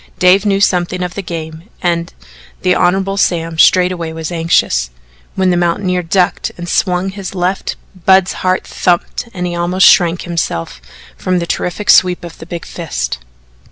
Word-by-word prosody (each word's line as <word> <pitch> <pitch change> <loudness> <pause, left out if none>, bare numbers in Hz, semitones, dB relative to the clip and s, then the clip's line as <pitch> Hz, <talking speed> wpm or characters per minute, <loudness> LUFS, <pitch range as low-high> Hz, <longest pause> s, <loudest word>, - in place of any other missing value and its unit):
Dave 185 +3 +4
knew 195 -1 +2
something 180 -2 +1
of 180 -1 -4
the 200 - -4
game 165 +1 -7
and 170 -1 -1 0.5
the 180 -1 +3
Hon. 190 +2 +1
Sam 165 -4 0
straightway 180 -2 +3
was 160 +1 -5
anxious, 165 - +1 0.5
when 190 -1 +2
the - - +2
mountaineer 180 +1 0
ducked 180 +1 0
and 175 0 -7
swung 180 +2 0
his 195 -1 -7
left 185 +1 -1 0.3
Budd's 190 -1 +5
heart 185 0 0
thumped 180 +6 -1
and 180 -4 -4
he 175 - -3
almost 175 +2 +2
shrank 175 0 +4
himself 85 - -3 0.3
from 185 0 -1
the 170 - -1
terrific 180 +4 0
sweep 180 -1 +4
of 170 -1 -10
the 160 - -10
big 170 -1 -6
fist. - - -4
180 Hz, 160 wpm, -15 LUFS, 170-185 Hz, 0.5 s, Budd's